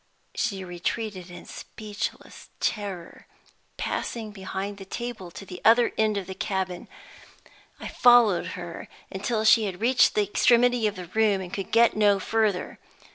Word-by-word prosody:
She 195 -5 -2
retreated 185 +2 -4
in 175 0 -11
speechless 210 -1 -7
terror, 195 -5 -4 0.5
passing 225 -3 -3
behind 195 0 -5
the - - -7
table 235 -3 -6
to 195 - -10
the 180 -2 -9
other 235 +2 +5
end 215 -1 +1
of 195 - -3
the 190 - -6
cabin. 190 -2 -3 0.9
I - - -6
followed 220 -7 +4
her 175 -2 -7 0.2
until 215 +3 -2
she 220 0 +6
had 185 -3 -5
reached 245 +3 +4
the 210 - +3
extremity 240 +3 +3
of 210 - -3
the 180 -1 -7
room 210 +2 +1
and 185 -1 -8
could 195 -2 -5
get 230 +1 +4
no 205 -2 +4
further. 215 -2 -1
205 Hz, 150 wpm, -26 LUFS, 185-225 Hz, 0.9 s, she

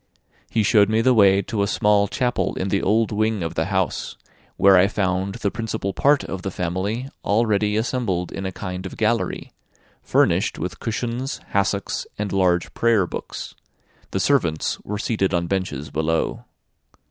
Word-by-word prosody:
He 110 - +1
showed 105 -1 +4
me 110 +1 +2
the 130 +2 +4
way 100 -3 +5
to 105 +2 -2
a 100 - +1
small 105 0 +3
chapel 125 +1 -1
in 95 - -2
the 100 0 +1
old 110 +2 +2
wing 110 -2 0
of 80 - -3
the - - 0
house, - - -2 0.4
where 100 0 +6
I 90 +1 +6
found 95 -1 -1
the 100 - -2
principal 110 -4 -3
part 140 +7 +3
of 95 - -5
the 95 - -3
family 95 +8 -2 0.2
already 105 -1 +2
assembled 110 -7 -1
in 95 - -5
a 95 - -3
kind 95 0 -5
of - - -10
gallery, 115 +1 -1 0.5
furnished - - +2
with - - -5
cushions, 120 +5 -3
hassocks, 100 0 -1
and 105 -1 -3
large 90 -2 +1
prayer 115 -5 +3
books; - - -7 0.6
the 95 - -2
servants 90 - +1
were 105 - -4
seated 100 -4 0
on 85 0 0
benches 85 -7 -3
below. 80 +2 -1
100 Hz, 165 wpm, -22 LUFS, 95-110 Hz, 0.6 s, where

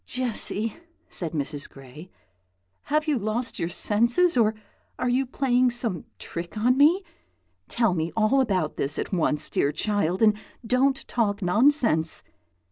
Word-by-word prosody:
"Jessy," 230 -3 -2 0.3
said 170 -3 -4
Mrs. 145 -1 -3
Gray, 135 +6 -13 0.8
"have 305 +2 0
you 290 -5 +1
lost 225 +4 -3
your 170 - -1
senses, 235 - +2
or 220 -3 +3 0.4
are 250 - -1
you 255 +2 +1
playing 255 -1 +2
some 230 - -1
trick 170 +4 -7
on 245 +4 +3
me? 315 +8 +4 0.6
Tell 230 -5 +1
me 165 -1 -2
all 225 +5 +3
about 185 -10 -1
this 140 +2 -2
at - - -4
once, 155 -4 0
dear 140 - 0
child, 190 +3 0
and 215 -1 +5 0.3
don't 265 +3 +1
talk 205 -4 -1
nonsense." 210 - +2
220 Hz, 140 wpm, -25 LUFS, 175-250 Hz, 0.8 s, and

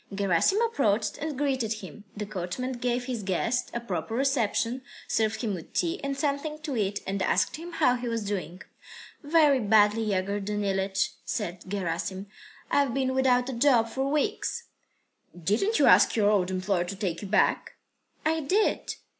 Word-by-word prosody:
Gerasim 200 - +2
approached 215 - 0
and 300 -2 -4
greeted 260 -6 0
him. 205 -1 -10
The 210 - -3
coachman 200 +6 -4
gave 245 0 -2
his 245 -4 -3
guest 205 +6 -1
a 235 - -3
proper 200 -2 -4
reception, 255 -2 0 0.3
served 220 -1 0
him 215 -3 -1
with 170 -4 -8
tea 345 0 -1
and 275 -1 -2
something 295 +1 -1
to 290 -4 -3
eat, 205 -2 -1
and 195 0 -2
asked - - +1
him 340 +2 -9
how 250 -5 +3
he 245 0 -5
was 230 -2 -2
doing. 185 -2 -4 0.6
"Very 295 -3 +4
badly, 210 0 +4
Yegor 200 -1 -1
Danilych," 195 -1 -1
said 180 -5 -4
Gerasim. 190 0 -3 0.5
"I've 275 -4 +2
been 260 -1 0
without 255 -1 +3
a - - -3
job 235 -2 +3
for 265 +3 -2
weeks." 305 +9 -1 0.8
"Didn't 225 - +1
you - - +4
ask - - +6
your 210 -2 +3
old 190 -3 +2
employer 185 -1 0
to 195 - -5
take 190 -4 -3
you 205 - -6
back?" 210 +3 +1 0.5
"I 320 +1 +2
did." 375 +9 0
225 Hz, 165 wpm, -27 LUFS, 195-270 Hz, 0.8 s, ask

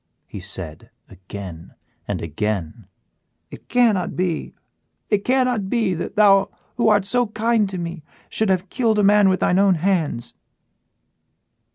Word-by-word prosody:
he 100 - -9
said, 90 -5 -7 0.2
again 95 -3 -10 0.3
and - - -3
again, 95 +2 -4 0.6
"it - - -13
cannot 225 -8 +2
be 175 -3 -2 0.6
it 205 -1 +2
cannot 250 -6 +1
be 220 -5 +1
that 170 - -5
thou 195 -2 +5 0.3
who 235 - +3
art 205 -2 +3
so 245 +4 +2
kind 220 -1 0
to 190 - -5
me 170 -1 -5 0.3
should 220 -2 -1
have 185 0 0
killed 225 -2 +1
a 210 - +3
man 205 0 +5
with 185 - 0
thine 180 - +2
own 195 -2 +4
hands." 165 -8 -1
190 Hz, 145 wpm, -21 LUFS, -, 0.6 s, thou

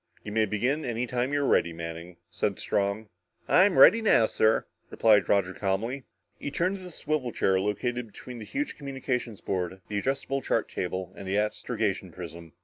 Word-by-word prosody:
"You 105 - -6
may 110 +1 +3
begin 125 +9 0
any 120 -1 -1
time 125 +2 -1
you 145 0 +1
are - - +1
ready, 85 - +3
Manning," 85 +1 -7
said - - -1
Strong. 100 +2 -1 0.4
"I'm 185 +1 +5
ready 225 +6 +8
now, 165 - +5
sir," 110 0 +2 0.2
replied 105 -3 +4
Roger 95 -2 +2
calmly. 110 +8 -2 0.3
He - - -4
turned 180 +7 0
to - - -12
the 180 - -8
swivel 150 -6 -2
chair 95 -3 +2
located 115 +5 -2
between 120 +3 -10
the 110 - -7
huge 290 - -3
communications 130 -6 -4
board, 95 0 -2
the 105 -1 -1
adjustable 135 +3 -1
chart - - 0
table 95 0 -4
and 95 - -8
the 95 +2 0
astrogation 105 -3 -1
prism. 85 -1 -9
110 Hz, 180 wpm, -28 LUFS, 95-135 Hz, 0.4 s, ready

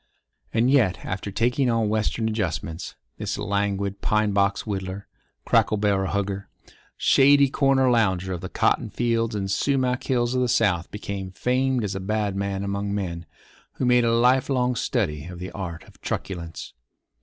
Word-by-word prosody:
And 115 +3 +2
yet, 115 -10 +2
after 95 +2 -4
taking 120 +6 +1
on 115 -2 +1
Western 110 +1 0
adjustments, 85 -6 -3 0.2
this - - -3
languid 100 -1 -1
pine 105 -1 +1
box 100 0 +2
whittler, 95 -1 -4 0.4
cracker 110 - +3
barrel 100 -2 +1
hugger, 100 -1 -2 0.5
shady 140 0 +5
corner 135 -1 +3
lounger 95 -6 +2
of 85 - -5
the - - -6
cotton - - +1
fields 115 -2 0
and 95 -2 -2
sumac 130 +1 +1
hills 120 -2 +1
of 130 - +1
the 125 - +2
South 95 -8 +1
became 100 -2 -5
famed 130 +2 +1
as 100 -2 -2
a 95 - -3
bad 105 0 -1
man 100 0 -2
among 100 0 -2
men 85 -4 -4 0.5
who - - -4
had 125 - +3
made 125 0 +5
a 115 - +2
life 125 +4 +3
long 125 -2 +1
study 80 - -1
of 90 0 -8
the 90 +1 -6
art 90 -4 -6
of - - -20
truculence. 85 -4 -5
105 Hz, 165 wpm, -24 LUFS, 95-120 Hz, 0.5 s, shady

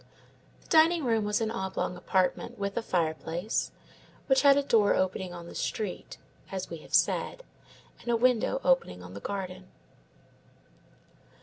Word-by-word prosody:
The - - -22
dining 325 0 +5
room 225 -3 +1
was 210 +2 0
an 220 -1 0
oblong 190 -4 -3
apartment, 185 +1 0
with 200 0 -3
a 235 - 0
fireplace, 170 +1 -1 0.6
which 265 -1 +4
had 280 -1 +6
a 285 - +2
door 220 -6 +3
opening 185 0 -1
on 170 -1 -8
the - - -10
street 210 -5 -4 0.3
(as 190 -2 -5
we 165 - -4
have 155 - -4
said), - - +1 0.6
and - - -8
a 235 - +3
window 250 +2 +2
opening 260 - +1
on 90 +1 -10
the 100 - -7
garden. 185 - -5
200 Hz, 150 wpm, -29 LUFS, 180-240 Hz, 0.6 s, had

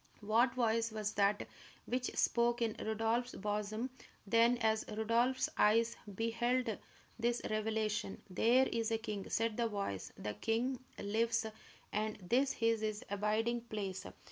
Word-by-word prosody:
What 230 +5 +3
voice 230 -2 +2
was 215 -1 -2
that 200 0 +2 0.4
which 250 0 -1
spoke 235 0 +2
in 225 -2 0
Rodolph's 225 +3 0
bosom 210 +4 -2 0.3
then 230 +4 +4
as 220 -1 +2
Rodolph's 230 +4 +2
eyes 230 +2 +4 0.2
beheld 230 +1 0 0.4
this 235 +1 +1
revelation? 215 -1 -1
"There 235 +7 +4
is 230 -3 -1
a 225 - +1
king!" 215 -3 -5
said 225 -1 0
the 235 -1 +2
voice. 200 - -3
"The 105 - -4
king 235 - 0 0.2
lives, 225 +3 +1 0.5
and 215 +1 0
this 245 +9 +1
is 230 -1 +3
his 215 -1 -2
abiding 215 +4 +1
place!" 195 -4 -4
225 Hz, 135 wpm, -35 LUFS, 210-235 Hz, 0.5 s, then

